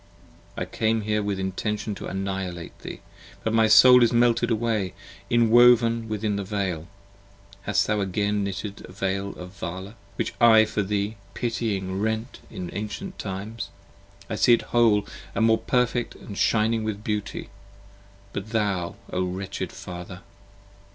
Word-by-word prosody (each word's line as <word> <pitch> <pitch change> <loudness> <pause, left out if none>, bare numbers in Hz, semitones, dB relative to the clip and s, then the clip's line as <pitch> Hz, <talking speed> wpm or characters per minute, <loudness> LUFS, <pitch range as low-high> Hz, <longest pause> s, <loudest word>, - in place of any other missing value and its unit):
I - - -1
came 110 0 0
here 105 0 0
with 100 -2 -2
intention 105 +3 -2
to 100 - -7
annihilate 95 -3 -4
thee; - - -8 0.4
But 110 - 0
My 110 -1 +5
soul 125 +3 +8
is 120 - +5
melted 120 0 +3
away, 110 -5 0 0.3
inwoven 120 0 +5
within 105 -1 -1
the 100 - -2
Veil. 95 -5 -2 0.7
5 - - -26
Hast 105 - +2
thou 105 0 0
again 100 +2 0
knitted 100 +1 -4
the - - -11
Veil 95 +1 -2
of 90 0 -9
Vala, 95 +2 -6 0.2
which - - -2
I 110 -2 +8
for 105 - -1
thee 100 +2 -1 0.2
Pitying 100 -5 -2
rent 110 +3 -2
in 90 -2 -6
ancient 110 - -5
times. 100 +3 -5 0.6
I 110 - -3
see 120 - +5
it 115 - +3
whole 115 -4 +4 0.3
and 115 - +3
more 110 0 +4
Perfect: 125 -1 0
and 100 - -9
shining 110 +2 +2
with 105 -1 -3
beauty! 105 -1 -3 0.8
But 100 +2 -5
thou! 100 -6 -1 0.2
O 95 - +1
wretched 95 +2 -4
Father! 90 +1 -8
105 Hz, 150 wpm, -25 LUFS, 95-115 Hz, 0.8 s, soul